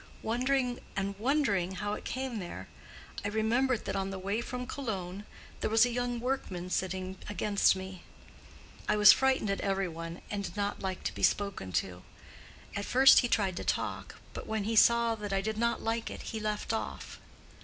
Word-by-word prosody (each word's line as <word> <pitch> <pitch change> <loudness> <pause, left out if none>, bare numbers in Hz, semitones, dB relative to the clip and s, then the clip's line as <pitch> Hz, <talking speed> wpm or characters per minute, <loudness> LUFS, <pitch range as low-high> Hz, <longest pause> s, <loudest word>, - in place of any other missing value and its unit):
Wondering 250 +2 0 0.2
and 195 0 -1
wondering 215 -8 +1
how 205 +2 -3
it - - -6
came 260 -3 -3
there, 175 -3 -7 0.6
I - - -1
remembered 225 +4 +1
that - - -2
on 195 0 -1
the 195 - -5
way 200 +4 -2
from 250 +1 -5
Cologne 205 -7 -4 0.3
there - - -1
was 225 +2 +6
a 245 - -1
young 245 0 -1
workman 195 -8 -3
sitting 185 0 -2
against 205 0 +3
me. 190 -1 -7 0.9
I - - +3
was 210 0 +10
frightened 265 -6 +2
at 195 - -2
every 195 -1 0
one, 165 +1 -7
and 205 -1 -2
did 200 - -6
not 205 0 -2
like 190 -1 -3
to - - -2
be - - -8
spoken 200 - +1
to. 90 +1 -1 0.7
At 200 - -2
first 265 +2 +7
he 245 - +1
tried 195 -6 +1
to - - -3
talk, - - -2 0.2
but - - -7
when 220 -1 -1
he 225 +2 -1
saw 235 +1 +5
that 210 -2 -5
I 195 - +2
did 220 +1 -3
not 235 0 0
like 225 0 -1
it, - - -7
he 220 - -4
left 215 +1 -2
off. 220 - -5
210 Hz, 190 wpm, -31 LUFS, 190-235 Hz, 0.9 s, was